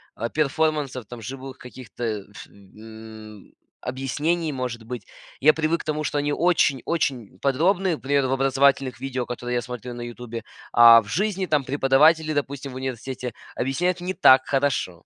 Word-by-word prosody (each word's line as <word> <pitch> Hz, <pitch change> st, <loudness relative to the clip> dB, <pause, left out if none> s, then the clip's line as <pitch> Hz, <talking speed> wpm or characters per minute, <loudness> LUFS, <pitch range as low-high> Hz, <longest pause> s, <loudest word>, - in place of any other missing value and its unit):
а, 115 Hz, +1 st, -3 dB
перформансов, 150 Hz, -4 st, -1 dB
живых 130 Hz, +4 st, -8 dB
каких-то 125 Hz, -1 st, -10 dB
э, 105 Hz, -3 st, -2 dB
ф -, -, -11 dB
э, 110 Hz, +1 st, -13 dB, 0.4 s
объяснений, 145 Hz, +5 st, -2 dB
может 125 Hz, -3 st, -4 dB
быть. 120 Hz, -3 st, -7 dB, 0.4 s
Я 155 Hz, +2 st, +6 dB
привык 160 Hz, +1 st, 0 dB
к -, -, -12 dB
тому, 155 Hz, 0 st, -2 dB
что 145 Hz, -, -2 dB
они 145 Hz, 0 st, 0 dB
очень 160 Hz, -6 st, +2 dB
очень 135 Hz, -10 st, -2 dB
подробные, 170 Hz, +5 st, +1 dB
пример, 140 Hz, -1 st, 0 dB
в -, -, -3 dB
образовательных 135 Hz, 0 st, +2 dB
видео, 130 Hz, -2 st, -3 dB
которые 125 Hz, 0 st, -4 dB
я 120 Hz, -, +1 dB
смотрю 125 Hz, 0 st, -7 dB
на 120 Hz, -, -8 dB
"Ютубе", 120 Hz, -1 st, -7 dB, 0.3 s
а 115 Hz, -1 st, +8 dB
в 105 Hz, -, -15 dB
жизни 195 Hz, -, -1 dB
там 145 Hz, -4 st, +1 dB
преподаватели, 150 Hz, +4 st, +3 dB
допустим, 140 Hz, -1 st, -3 dB
в -, -, -10 dB
университете 130 Hz, -1 st, -5 dB, 0.2 s
объясняют 175 Hz, +8 st, -1 dB
не 180 Hz, +1 st, -3 dB
так 130 Hz, -5 st, +6 dB
хорошо. 135 Hz, -11 st, -1 dB
135 Hz, 160 wpm, -24 LUFS, 120-150 Hz, 0.4 s, а